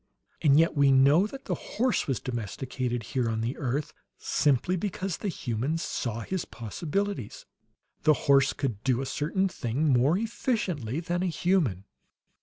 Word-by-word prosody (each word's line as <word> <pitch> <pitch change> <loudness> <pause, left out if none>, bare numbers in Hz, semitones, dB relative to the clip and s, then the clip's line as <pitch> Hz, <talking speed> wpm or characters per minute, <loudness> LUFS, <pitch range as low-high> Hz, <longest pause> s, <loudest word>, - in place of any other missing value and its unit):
And 145 -2 +5
yet 165 - +3
we 140 -2 +4
know 140 +8 +5
that 270 +4 -10
the - - -1
horse 250 +3 -1
was 135 -4 0
domesticated, 120 +1 -3
here 125 -3 +1
on 110 0 -1
the 120 +5 -2
earth, 140 +1 -2 0.2
simply 145 +5 +1
because 185 -1 -3
the - - -4
humans 140 - -2
saw 115 -2 -3
his 185 +7 -3
possibilities; 155 - -4 0.6
the 155 - +5
horse 140 -1 +5
could 120 -7 -3
do 130 -1 +1
a - - -3
certain 175 +8 0
thing 145 -3 -1
more 135 +8 +4
efficiently 190 - -2
than 175 +1 -2
a 185 - +1
human. 160 - +1
140 Hz, 155 wpm, -28 LUFS, 125-180 Hz, 0.6 s, And